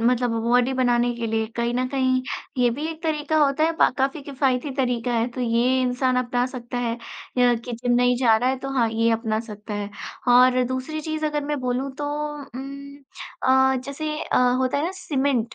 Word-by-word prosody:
मतलब 245 +1 +2
बॉडी 245 +2 +3
बनाने 245 -1 +2
के 235 -1 -3
लिए 220 0 0
कहीं 235 0 0
न 255 +1 0
कहीं 260 -1 +1 0.4
ये 245 -1 +4
भी 300 +2 -3
एक 320 +1 -10
तरीका 310 -1 -1
होता 295 +1 +3
है, 330 - +2
पा - - +5
काफ़ी 270 +3 0
किफ़ायती 270 -1 -1
तरीका 245 -3 0
है 230 0 +1
तो 255 - -6
ये 245 +2 +2
इंसान 255 0 +1
अपना 245 0 +1
सकता 245 -1 -6
है, 235 -1 -1 0.4
या 245 -1 +5
कि 235 +1 -6
जिम 245 +1 -1
नहीं 245 0 +3
जा 230 -4 +5
रहा 245 +3 +1
है 265 - -1
तो 270 - -6
हाँ, 235 -3 +3
ये 230 +1 +2
अपना 225 -1 0
सकता 210 -1 -8
है। 205 0 -3 0.4
ह - - +5
और 250 +1 +6
दूसरी 260 +5 -3
चीज़ 310 0 -2
अगर 295 -1 -2
मैं 295 0 -2
बोलूँ 255 +2 -1
तो 295 - -2 0.4
उम 275 +2 -9 0.5
अ, 265 0 +4
जैसे 295 +3 -4
अ, - - +1 0.2
होता 260 +2 +1
है 295 - 0
ना 355 - -1
सीमेंट, 270 -8 -1
255 Hz, 210 wpm, -23 LUFS, 240-275 Hz, 0.5 s, और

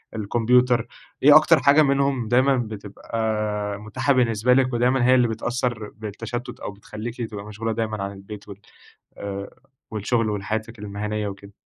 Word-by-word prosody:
الكمبيوتر، 120 +3 +2 0.4
إيه 145 +1 +9
أكتر 155 -3 +7
حاجة 140 +4 +5
منهم 140 -4 +1
دايمًا 130 +3 +3
بتبقى 105 -1 -3
متاحة 110 +6 0
بالنسبة 120 -1 +3
لِك، 130 -1 +2
ودايمًا 125 +1 +2
هي 130 +1 +6
اللي 125 -1 +4
بتأثّر 120 -1 -2
بالتشتت 115 +3 -6
أو - - -5
بتخلّيكِ 110 +4 -7
تبقى 100 -1 -7
مشغولة 110 +2 -4
دايمًا 110 -2 -2
عن 100 - -4
البيت 100 +1 -10
وال 100 - -8 0.6
آآ 100 0 -5 0.4
والشغل 110 +1 0
وحياتِك 110 +2 -3
المهنية 105 +1 -3
وكده؟ 100 0 -9
110 Hz, 145 wpm, -23 LUFS, 105-125 Hz, 0.6 s, إيه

